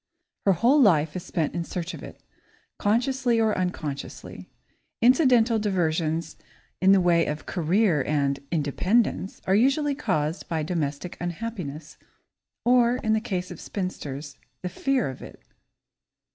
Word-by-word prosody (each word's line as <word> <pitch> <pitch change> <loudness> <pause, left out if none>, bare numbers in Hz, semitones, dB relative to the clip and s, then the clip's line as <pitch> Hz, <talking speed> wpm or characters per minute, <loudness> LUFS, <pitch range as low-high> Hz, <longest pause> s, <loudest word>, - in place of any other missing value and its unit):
Her 195 - +6
whole 245 - +4
life 160 - +4
is 180 - -3
spent 160 -4 -2
in 170 - -2
search 175 +1 -5
of - - -8
it, - - -11 0.6
consciously 240 +2 +1
or 220 -2 +2
unconsciously. 155 -6 -5 0.5
Incidental 245 -2 +4
diversions 165 -5 -1 0.4
in 190 +1 +6
the 195 - +6
way 170 -2 +3
of 150 +1 -4
"career" 175 -2 +1
and 140 -2 0
"independence" 180 - 0
are 190 - +2
usually 275 +7 +3
caused 170 - -2
by 160 -2 -1
domestic 155 0 -3
unhappiness, 175 -5 -5 0.7
or, 245 0 +4
in 220 -3 0
the 220 - +1
case 185 -6 -3
of - - -9
spinsters, 150 -7 -5 0.2
the 180 - -2
fear 260 - 0
of 130 -1 -7
it. - - -11
180 Hz, 135 wpm, -25 LUFS, 155-230 Hz, 0.7 s, Her